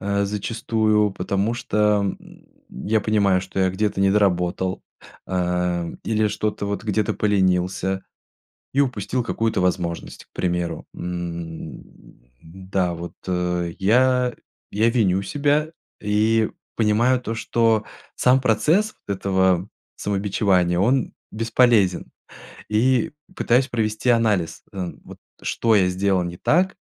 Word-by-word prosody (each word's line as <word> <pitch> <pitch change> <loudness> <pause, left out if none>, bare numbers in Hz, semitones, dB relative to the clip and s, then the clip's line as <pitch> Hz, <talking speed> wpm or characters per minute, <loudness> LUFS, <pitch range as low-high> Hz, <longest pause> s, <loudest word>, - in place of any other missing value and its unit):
э, 100 0 0
зачастую, 105 0 0
потому 100 +4 -1
что, 105 -3 +1 0.2
м, - - -17 0.2
я 110 +1 -1
понимаю, 100 -3 +2
что 95 +1 -7
я 95 - +3
где-то 100 +1 -1
недоработал. 95 -2 +1 0.4
Эм, 90 -2 -1
или 110 -1 +1
что-то 105 -1 -2
вот, 100 +2 -3
где-то 105 -1 0
поленился 95 -1 +1 0.7
и 140 - +2
упустил 125 -1 -1
какую-то 115 -4 -1
возможность, 90 -2 -2
к - - -55
примеру. 85 -2 -2
М. 85 -2 -6 0.6
Да, 95 +1 -2
вот 85 +1 -7 0.6
я. 125 +4 +3 0.4
Я 110 +3 +2
виню 100 -6 +2
себя 145 +4 0 0.3
и 110 +2 +2 0.3
понимаю 115 +4 +3
то, 115 -2 -4
что 115 -1 +1 0.3
сам 130 +1 +4
процесс 150 - +2
этого 95 -1 +1 0.3
самобичевания- 95 -3 +1
он 125 +4 +2 0.2
бесполезен. 115 -4 +2 0.6
И 120 +5 +2 0.2
пытаюсь 125 +3 +2
провести 110 0 -1
анализ, 110 -8 +1
э, 90 -3 -4
вот - - -12 0.2
что 115 -2 +1
я 95 -3 +4
сделал 95 0 +1
не 85 0 -6
так 180 - +2
105 Hz, 115 wpm, -22 LUFS, 95-115 Hz, 0.7 s, сам